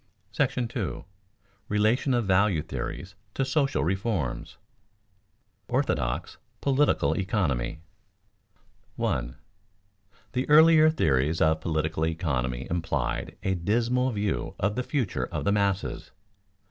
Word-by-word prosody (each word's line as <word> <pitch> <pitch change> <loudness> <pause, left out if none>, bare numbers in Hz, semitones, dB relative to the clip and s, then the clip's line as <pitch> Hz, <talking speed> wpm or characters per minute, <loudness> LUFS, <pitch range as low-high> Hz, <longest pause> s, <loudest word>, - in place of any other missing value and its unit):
§ 120 -2 -1 0.2
II. - - -11 0.7
RELATION 110 +6 +2
OF 120 -2 0
VALUE 95 -4 +2
THEORIES 95 +2 -6 0.2
TO 135 - 0
SOCIAL 135 - +1
REFORMS 95 - -2
[Sidenote: - - -40 1.0
"Orthodox" - - -1 0.2
political 140 +1 +2
economy] 80 - -1 1.1
1. 70 - -2 1.0
_The 125 0 -1
earlier 155 +1 +7
theories 75 - +1
of 80 0 +2
political 80 0 -1
economy 65 -6 -2
implied 85 -1 -2
a 95 - +1
dismal 115 +8 +1
view 105 -3 -2
of 100 +2 0
the 125 - 0
future 125 - -1
of - - -4
the 100 - +3
masses. 100 -2 -1
100 Hz, 110 wpm, -27 LUFS, 80-120 Hz, 1.1 s, earlier